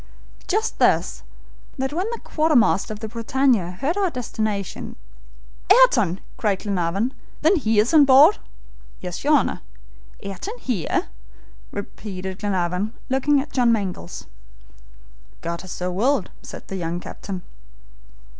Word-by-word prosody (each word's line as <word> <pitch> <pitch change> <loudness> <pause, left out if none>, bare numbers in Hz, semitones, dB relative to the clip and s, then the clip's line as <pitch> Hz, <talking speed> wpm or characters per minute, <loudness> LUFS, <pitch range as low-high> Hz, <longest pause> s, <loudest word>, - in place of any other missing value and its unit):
"Just - - -1
this, - - +2 0.6
that 265 +2 -2
when 365 +7 -1
the 470 - -4
quartermaster 245 - +2
of 215 0 -7
the 220 - -3
BRITANNIA 230 -4 +1
heard 325 +8 0
our 390 -2 +2
destination 215 - -3 0.4
" - - -25
"Ayrton!" 360 - +5 0.2
cried 205 -4 0
Glenarvan. 200 +4 -1 0.3
"Then 330 +6 +5
he 225 -7 +1
is 215 +8 +3
on 300 -3 +8
board?" 280 +9 +7 0.6
"Yes, 180 -1 -6
your 295 +2 +3
Honor." 285 - +1 0.6
"Ayrton 200 - -6
here?" 240 - -1 0.6
repeated 190 -2 -6
Glenarvan, 190 +1 -1 0.2
looking 275 +2 +3
at 295 - -9
John 245 -3 +4
Mangles. 190 - -3 1.2
"God 170 0 -4
has 185 - -9
so 180 0 -3
willed!" 235 +4 +1
said - - -10
the 195 - -5
young 170 -1 -3
captain. 185 0 -7
215 Hz, 130 wpm, -23 LUFS, 185-275 Hz, 1.2 s, on